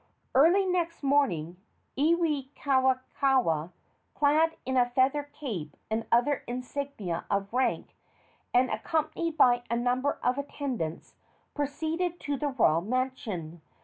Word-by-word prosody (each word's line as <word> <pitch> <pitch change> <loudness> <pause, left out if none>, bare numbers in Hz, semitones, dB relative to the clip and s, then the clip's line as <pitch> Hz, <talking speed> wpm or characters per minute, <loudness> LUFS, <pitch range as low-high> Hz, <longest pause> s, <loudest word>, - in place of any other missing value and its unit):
Early 340 +9 +5
next 345 -3 -1
morning 210 - +1 0.4
Iwikauikaua, 265 - +1 0.4
clad 310 +3 +3
in 260 - -1
a 245 -1 +3
feather 265 +4 +2
cape 210 - -6
and 225 +1 -1
other 245 +4 +2
insignia 250 -7 -4
of 200 +1 -1
rank, 255 +1 0 0.6
and 250 +1 +3
accompanied 320 +1 -1
by 245 -1 +5
a 235 - +1
number 250 +4 0
of 250 +2 +1
attendants, 260 - -4 0.4
proceeded 320 +4 -2
to 285 - -2
the 290 +2 -2
royal 170 - +3
mansion. 215 - -3
260 Hz, 115 wpm, -28 LUFS, 235-290 Hz, 0.6 s, Early